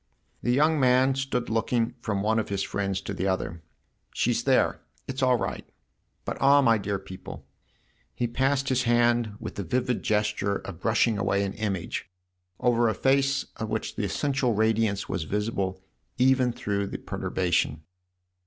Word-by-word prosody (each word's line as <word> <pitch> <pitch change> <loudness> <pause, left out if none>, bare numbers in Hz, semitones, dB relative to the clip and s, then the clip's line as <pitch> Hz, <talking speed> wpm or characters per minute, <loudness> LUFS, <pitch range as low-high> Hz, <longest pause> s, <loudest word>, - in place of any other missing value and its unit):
The - - -2
young 150 +4 +3
man 130 +1 +4
stood 135 -2 -2
looking 115 +1 0
from 100 -4 -1
one 110 +1 +2
of 110 - -3
his 100 -1 -1
friends 100 -1 -2
to 100 - -5
the 95 0 -2
other. 95 -2 -2 0.2
" - - -39
She's - - +1
there - - +2 0.3
it's 135 0 -4
all 130 -1 +4
right. - - -3 0.6
But - - -4
ah, 140 +1 +6
my 115 -3 +4
dear 100 0 -2
people! 95 -1 -9
" - - -8
And - - -15 0.7
he 120 - 0
passed 135 +3 0
his 130 -1 +2
hand, 120 -2 +3
with - - -7
the 100 - -2
vivid 125 +7 -1
gesture 105 -1 0
of 95 -4 -7
brushing 110 0 +2
away 100 0 +1
an 100 -1 -2
image, 100 -4 -3 0.5
over 120 -1 +3
a 110 - -1
face 135 +3 +2
of 110 -1 -4
which 110 0 -3
the - - -2
essential 135 +2 0
radiance 110 -1 +1
was 80 - -3
visible 95 -1 -2 0.3
even 130 0 +4
through 100 -3 -2
perturbation. 85 -5 -1
110 Hz, 170 wpm, -27 LUFS, 100-125 Hz, 0.7 s, ah